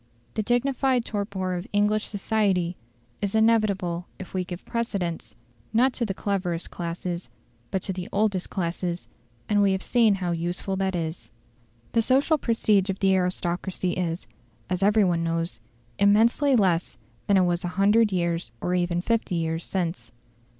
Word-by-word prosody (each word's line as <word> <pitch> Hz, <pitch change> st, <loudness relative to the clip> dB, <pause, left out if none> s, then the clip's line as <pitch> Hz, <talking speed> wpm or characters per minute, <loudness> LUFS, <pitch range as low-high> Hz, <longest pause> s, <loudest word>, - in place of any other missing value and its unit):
The 215 Hz, -, 0 dB
dignified 250 Hz, +2 st, +1 dB
torpor 200 Hz, -3 st, -2 dB
of 180 Hz, +2 st, -4 dB
English 210 Hz, +1 st, +2 dB
society 195 Hz, -4 st, 0 dB, 0.5 s
is 200 Hz, +1 st, -1 dB
inevitable 200 Hz, -6 st, +2 dB
if 190 Hz, -, -9 dB
we 185 Hz, -1 st, 0 dB
give 175 Hz, 0 st, -8 dB
precedence, 200 Hz, -8 st, -3 dB, 0.4 s
not 250 Hz, +3 st, +4 dB
to 235 Hz, -, -1 dB
the 195 Hz, -, -3 dB
cleverest 180 Hz, -5 st, -2 dB
classes, 175 Hz, +1 st, -4 dB, 0.4 s
but 190 Hz, -, -2 dB
to 190 Hz, -, -2 dB
the 180 Hz, -1 st, -6 dB
oldest 200 Hz, -3 st, 0 dB
classes, 175 Hz, -1 st, -3 dB, 0.4 s
and 205 Hz, -1 st, +3 dB
we 200 Hz, -1 st, +4 dB
have 190 Hz, -, -1 dB
seen 230 Hz, -4 st, +4 dB
how 180 Hz, -2 st, -2 dB
useful 175 Hz, +3 st, -1 dB
that 190 Hz, -1 st, 0 dB
is. 165 Hz, -1 st, -4 dB, 0.6 s
The 230 Hz, -, +3 dB
social 275 Hz, +6 st, +3 dB
prestige 210 Hz, -5 st, +2 dB
of 195 Hz, -, -1 dB
the 195 Hz, -1 st, +3 dB
aristocracy 180 Hz, 0 st, -1 dB
is, 175 Hz, -1 st, -2 dB, 0.5 s
as 180 Hz, 0 st, 0 dB
every 210 Hz, +2 st, +4 dB
one 170 Hz, -3 st, +1 dB
knows, 165 Hz, +1 st, -2 dB, 0.4 s
immensely 230 Hz, +7 st, +4 dB
less 185 Hz, -6 st, +1 dB, 0.3 s
than 200 Hz, -, +4 dB
it 185 Hz, -, +5 dB
was 175 Hz, +1 st, 0 dB
a -, -, -1 dB
hundred 210 Hz, +2 st, +4 dB
years 170 Hz, -7 st, -1 dB
or 180 Hz, -, -1 dB
even 175 Hz, -1 st, +1 dB
fifty 225 Hz, -2 st, 0 dB
years 165 Hz, 0 st, -1 dB
since. 175 Hz, -, -3 dB
190 Hz, 155 wpm, -25 LUFS, 175-215 Hz, 0.6 s, it